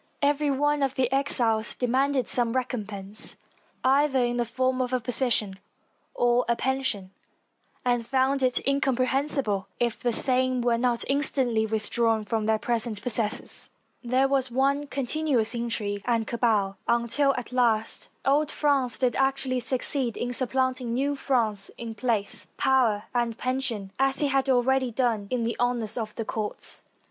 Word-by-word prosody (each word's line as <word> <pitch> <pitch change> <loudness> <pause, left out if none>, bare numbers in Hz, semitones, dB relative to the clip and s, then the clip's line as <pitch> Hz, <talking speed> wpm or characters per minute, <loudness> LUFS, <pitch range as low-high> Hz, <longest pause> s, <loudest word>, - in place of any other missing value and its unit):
Every 290 +1 +2
one 290 +1 +1
of 270 -1 0
the 255 -2 0
exiles 235 -5 +1
demanded 260 +2 +1
some 235 -2 +1
recompense, 215 -5 -3 0.5
either 275 +1 +3
in 240 -1 +1
the 240 - +1
form 255 +2 0
of 255 0 -2
a 255 - +2
position 230 -5 0 0.6
or 245 0 +3
a 235 - +3
pension, 255 -8 -2 0.7
and 245 -1 +1
found 265 +3 +1
it 255 -1 +2
incomprehensible 265 -5 +1
if 240 -2 0
the 240 - 0
same 255 +1 +2
were 235 -1 +1
not 240 -1 +1
instantly 260 -5 +1
withdrawn 220 0 0
from 220 0 -1
their 220 0 +3
present 230 -1 -2
possessors. 225 -3 +1 0.3
There 255 +3 +2
was 270 -1 0
one 275 +3 +1
continuous 275 -4 0
intrigue 225 -4 -3
and 230 -2 +1
cabal 215 -5 0
until, 235 +4 +2
at 250 -1 -6
last, 230 -3 +1 0.2
old 290 +2 +3
France 275 -6 +1
did 250 -3 +1
actually 270 -1 0
succeed 255 0 0
in 245 0 -3
supplanting 255 -1 -1
new 280 +3 0
France 225 -8 0
in 230 -1 -6
place, 220 -3 -1
power, 240 -6 +2
and 235 -2 -1
pension, 255 -6 -3
as 270 +2 +2
it 285 - +2
had 270 0 +1
already 260 0 +2
done 230 -4 0
in 250 -2 -1
the 230 +1 -1
honors 240 -3 0
of 220 -3 -4
the 225 - -4
courts. 215 -1 -2
245 Hz, 150 wpm, -26 LUFS, 230-265 Hz, 0.7 s, either